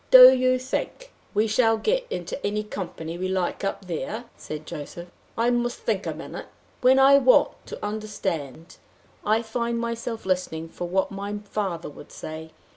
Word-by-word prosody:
"Do 255 0 +12
you 255 0 +3
think 385 - -4 0.2
we 210 +2 +4
shall 225 +1 +3
get - - 0
into 460 -10 -5
any 210 +1 0
company 175 -5 -6
we 185 - -1
like 185 0 -1
up 195 0 -2
there?" 200 +7 -4
said 155 0 -7
Joseph. 170 +4 -7 0.3
"I 235 +2 +3
must 240 0 0
think - - -1
a - - -1
minute. - - -7 0.3
When 255 +1 +6
I 275 +1 +7
want 255 -1 +5 0.2
to - - -6
understand, 180 - -4 0.5
I 220 +2 +2
find 235 +1 -2
myself 230 -1 -3
listening 180 -3 -1
for 175 - -5
what 190 +1 +1
my 200 +1 -4
father 195 -5 -3
would 145 0 -12
say. 160 +1 -7
210 Hz, 165 wpm, -25 LUFS, 175-240 Hz, 0.5 s, Do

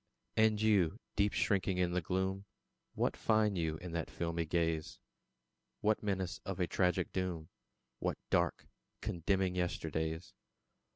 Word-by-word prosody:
And 110 -1 +4
You, 105 -7 +3 0.2
deep 100 0 +3
shrinking 95 -2 +1
in 90 -1 +2
the 90 +1 +1
gloom, 95 +3 -1 0.5
What - - +1
find 110 -2 +3
you 80 -3 0
in 90 +2 -7
that 85 0 -2
filmy 85 -1 -2
gaze? 80 -1 0 0.8
What 110 0 +2
menace 95 -4 -1
of 95 -1 -4
a 90 - +3
tragic 90 0 +1
doom? 90 -4 -2 0.5
What - - -1
dark, - - +2 0.4
condemning 95 +2 +1
yesterdays? 80 -2 -2
90 Hz, 130 wpm, -35 LUFS, 85-100 Hz, 0.8 s, And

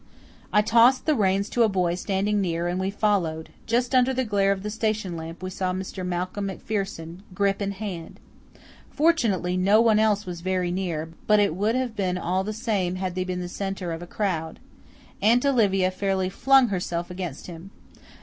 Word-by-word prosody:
I 210 - +4
tossed 235 +4 +4
the 310 - +3
reins 200 -4 +1
to 240 - 0
a 225 - +5
boy 180 -3 +1
standing 200 +3 0
near 170 -2 -1
and 175 +1 -1
we 190 +1 -1
followed. 190 -6 0 0.2
Just 245 +3 +1
under 255 0 +4
the 260 0 0
glare 200 -2 +2
of 195 -1 -2
the 210 - -3
station 215 -4 -1
lamp 165 +2 -8
we 185 - -4
saw 185 -1 -2
Mr. 185 0 -5
Malcolm 180 +3 -3
MacPherson, 190 -4 -4 0.2
grip 200 0 +1
in 200 - -1
hand. 190 -5 -7 0.7
Fortunately 230 - +1
no 200 +4 +4
one 225 -2 +4
else 215 -1 +2
was 175 -2 -6
very 185 -1 -1
near, 170 -4 -3 0.2
but 210 -1 +5
it 200 -5 +2
would 210 +5 +1
have 255 -3 -2
been 185 -3 -1
all 185 +2 -1
the 210 - -3
same 210 -5 -1
had 185 -1 -3
they 185 0 -1
been 180 -1 -3
the 180 - -4
centre 195 -1 -4
of 165 0 -5
a 175 - -8
crowd. 170 -6 -2 0.6
Aunt 235 +6 +4
Olivia 195 -8 +3
fairly 190 0 -1
flung 270 +5 +4
herself 175 -2 -3
against 180 -6 -6
him. 175 +2 -9
195 Hz, 190 wpm, -25 LUFS, 180-215 Hz, 0.7 s, a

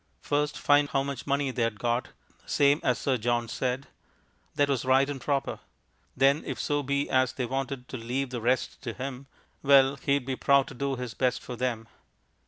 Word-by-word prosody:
First, 145 0 0
find 145 0 +3
how 135 -2 +1
much 140 -2 -5
money 140 -1 +1
they'd 115 -4 -1
got, 120 +2 -1 0.4
same 145 +1 +3
as 125 -3 +2
Sir 130 +3 0
John 120 +1 0
said; 125 +3 -2 0.7
that 145 - +3
was 140 -3 0
right 130 +1 +4
and 140 -2 -5
proper. 140 -1 -1 0.6
Then 135 +3 +4
if - - -5
so 145 -1 0
be 140 +1 -1
as 130 -1 +2
they 130 -1 -2
wanted 135 0 -3
to 130 - -5
leave 125 +3 -3
the 120 -2 -4
rest 125 +2 0
to 115 - -4
him, 135 +1 -6 0.3
well 135 -1 +5
he'd 140 0 0
be 135 0 -2
proud 140 +1 +4
to - - -9
do 140 +1 -2
his 125 -3 -5
best 125 +1 0
for 125 - -6
them. 115 -2 -2
135 Hz, 190 wpm, -28 LUFS, 125-140 Hz, 0.7 s, well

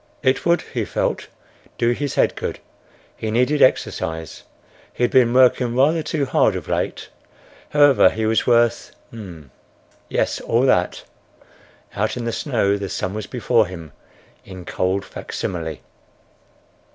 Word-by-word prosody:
It 130 +4 +1
would, 170 +1 +3
he - - -1
felt, - - -2 0.5
do 120 0 +2
his 140 +3 -3
head - - +2
good. - - -4 0.6
He 110 - -4
needed 125 +6 +1
exercise. 80 - 0 0.5
He - - -3
had 120 - +2
been 125 -3 +4
working 125 -1 +3
rather 150 +6 +3
too 155 -2 -2
hard - - +2
of - - -6
late. - - -3 0.6
However, 145 -9 +5
he 110 +2 -3
was 110 0 +1
worth—yes, 115 - -3
all 115 +2 +1
that!—Out 90 0 -3
in 120 - -4
the 115 - -1
snow 110 -6 0
the 100 -1 -4
sum 95 +1 -3
was 105 -1 -5
before 120 -3 +1
him 85 -4 -9 0.5
in 95 -2 -10
cold 95 +3 -1
facsimile. 80 -4 -5
115 Hz, 130 wpm, -21 LUFS, 95-130 Hz, 0.6 s, However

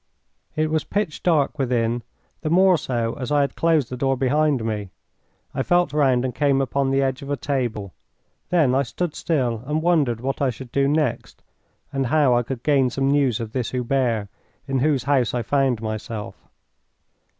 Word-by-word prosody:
It 155 0 0
was 155 -1 +1
pitch 200 -7 -2
dark 155 -3 +1
within 120 -2 0 0.4
the 155 - -2
more 185 +2 +5
so 120 -7 -2
as 130 +2 -4
I 145 -1 +4
had 140 - -1
closed 160 -7 +1
the - - -3
door 135 +1 0
behind 135 -1 +1
me. 105 -3 -3 0.6
I - - -1
felt 175 0 +2
round 130 -4 +2
and 125 - -2
came 140 0 +2
upon 135 +1 0
the 135 0 +2
edge 130 -1 -1
of 140 - -8
a 145 - -1
table. 120 - -3 0.6
Then 155 -8 +3
I 135 - +3
stood 150 +6 -3
still 125 -9 -1
and 155 +2 -1
wondered 150 -10 +2
what 135 +3 -3
I 140 - +3
should 125 0 -8
do 140 0 +2
next, 150 -4 -1 0.5
and 135 -2 0
how 140 -2 +3
I 120 - +3
could 120 0 -6
gain 140 -4 +3
some 135 +2 0
news 140 -6 +2
of 115 -2 -5
this 120 -1 -2
Hubert, 125 -4 0 0.4
in 135 -1 0
whose 140 -2 +1
house 130 -3 +1
I 120 - -1
found 130 -2 +1
myself. 110 0 -6
135 Hz, 185 wpm, -22 LUFS, 120-145 Hz, 0.6 s, more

